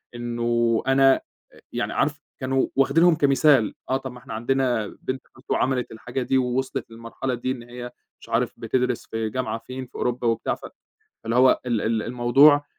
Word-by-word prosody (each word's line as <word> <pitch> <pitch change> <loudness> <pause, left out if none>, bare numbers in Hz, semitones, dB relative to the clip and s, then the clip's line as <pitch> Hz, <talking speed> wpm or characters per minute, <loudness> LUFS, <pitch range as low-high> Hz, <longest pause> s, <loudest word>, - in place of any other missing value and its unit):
إنّه 120 -1 0
أنا 135 0 +5 0.5
يعني - - -2
عارف - - 0 0.2
كانوا 130 0 +1
واخدينهم 160 +6 +4
كمثال 140 -5 +4 0.2
آه، 130 - +2
طَب 130 -2 -8
إحنا 120 - -9
عندنا 120 -1 0
بنت 130 0 -3
خالته - - -2
عملت 130 -2 0
الحاجة 125 +4 -5
دي 130 - +1
ووصلت 130 -1 -1
للمرحلة 115 +3 -5
دي 120 +2 -2
إن 125 -2 -5
هي 120 0 -8 0.3
مش - - -14
عارف 115 +1 0
بتدرس 125 +1 -1
في 110 -1 -2
جامعة 130 +1 -2
فين 130 +3 -7
في - - -24
أوروبا 125 0 -1
وبتاع، 115 -1 0
فاللي - - -14 0.5
هو 130 +1 +5
ال 115 -4 +1
ال 110 -1 0
الموضوع 135 +5 +5
125 Hz, 165 wpm, -24 LUFS, 120-135 Hz, 0.5 s, أنا